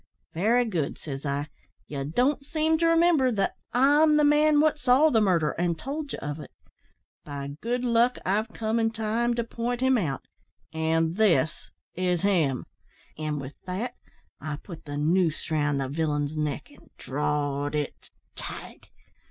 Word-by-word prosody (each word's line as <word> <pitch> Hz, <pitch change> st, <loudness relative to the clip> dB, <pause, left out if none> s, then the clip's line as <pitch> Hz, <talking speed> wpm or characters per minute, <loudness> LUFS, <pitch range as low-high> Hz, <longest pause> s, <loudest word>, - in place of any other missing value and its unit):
"`Very 230 Hz, +8 st, +3 dB
good,' 170 Hz, -9 st, -2 dB
says 140 Hz, -1 st, -6 dB
I, 140 Hz, +1 st, -1 dB, 0.4 s
`ye 140 Hz, 0 st, -4 dB
don't 270 Hz, -, +2 dB
seem 315 Hz, +2 st, +1 dB
to 335 Hz, -, +3 dB
remimber 330 Hz, -6 st, +4 dB
that 195 Hz, -2 st, 0 dB, 0.2 s
I'm 295 Hz, +4 st, +5 dB
the 300 Hz, -, +4 dB
man 295 Hz, 0 st, +5 dB
what 305 Hz, 0 st, +3 dB
saw 270 Hz, +4 st, +4 dB
the 225 Hz, -, +4 dB
murder, 170 Hz, -7 st, +2 dB
and 170 Hz, -1 st, -1 dB
told 285 Hz, -, -5 dB
ye -, -, -4 dB
of 145 Hz, +1 st, -5 dB
it. -, -, -9 dB, 0.7 s
By 140 Hz, -1 st, -6 dB
good 245 Hz, +2 st, -1 dB
luck, 240 Hz, +1 st, +3 dB
I've 210 Hz, +4 st, +1 dB
come 220 Hz, +1 st, -1 dB
in 225 Hz, 0 st, +2 dB
time 225 Hz, +2 st, 0 dB
to 235 Hz, -, 0 dB
point 235 Hz, +1 st, -3 dB
him 260 Hz, -1 st, +3 dB
out 140 Hz, -9 st, -2 dB, 0.5 s
an' 160 Hz, 0 st, +1 dB
this 170 Hz, -7 st, +2 dB, 0.2 s
is 180 Hz, -1 st, 0 dB
him.' 160 Hz, -10 st, +2 dB, 0.5 s
An' 155 Hz, -1 st, -2 dB
with 140 Hz, 0 st, -6 dB
that 215 Hz, +7 st, -3 dB, 0.5 s
I 150 Hz, 0 st, -4 dB
put 165 Hz, +2 st, -11 dB
the 145 Hz, -1 st, -5 dB
noose 165 Hz, +2 st, +1 dB
round 145 Hz, -2 st, +1 dB
the 135 Hz, -, -1 dB
villain's 150 Hz, 0 st, -1 dB
neck 150 Hz, -, -3 dB
and -, -, -19 dB
drawed 145 Hz, +1 st, -1 dB
it 150 Hz, -2 st, -4 dB, 0.3 s
tight. -, -, -8 dB
185 Hz, 160 wpm, -27 LUFS, 150-245 Hz, 0.7 s, I'm